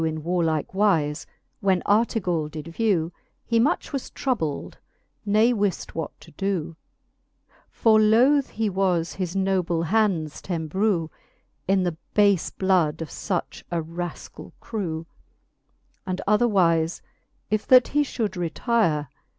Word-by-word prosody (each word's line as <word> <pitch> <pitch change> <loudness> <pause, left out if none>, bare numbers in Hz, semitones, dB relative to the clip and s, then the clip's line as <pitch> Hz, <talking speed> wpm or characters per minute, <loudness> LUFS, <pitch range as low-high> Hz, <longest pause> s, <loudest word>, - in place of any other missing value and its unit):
In 155 -1 -2
warlike 165 -2 0
wife, 170 -7 +1 0.3
when 190 -2 +1
Artegall 190 -7 +1
did 155 +1 -8
vew, 175 -3 0 0.3
He 230 -1 +2
much 290 +5 0
was 275 - -3
troubled, 190 - -3 0.5
ne 215 +4 +4
wift 205 -5 -1
what 160 -2 -3
to - - -15
doo, 180 -2 -2 0.9
For 220 -1 +4
loth 255 +6 +4
he 220 0 -2
was 185 -3 0
his 185 -1 -4
noble 185 -3 0
hands 175 -5 0
t'embrew 170 0 -1 0.6
In 190 0 +3
the 175 -3 -2 0.2
bafe 200 -4 +3
blood 170 -5 +2
of 160 - -9
fuch 180 -5 -4
a 170 - -1
rafcall 165 +2 -7
crew 165 -7 -4
j - - -40 0.9
And 185 0 -2
otherwife, 185 -7 +2 0.5
if 215 0 0
that 255 -1 +6
he 295 - +2
fhould 225 -8 -2
retire. 170 - 0
185 Hz, 125 wpm, -24 LUFS, 165-215 Hz, 0.9 s, that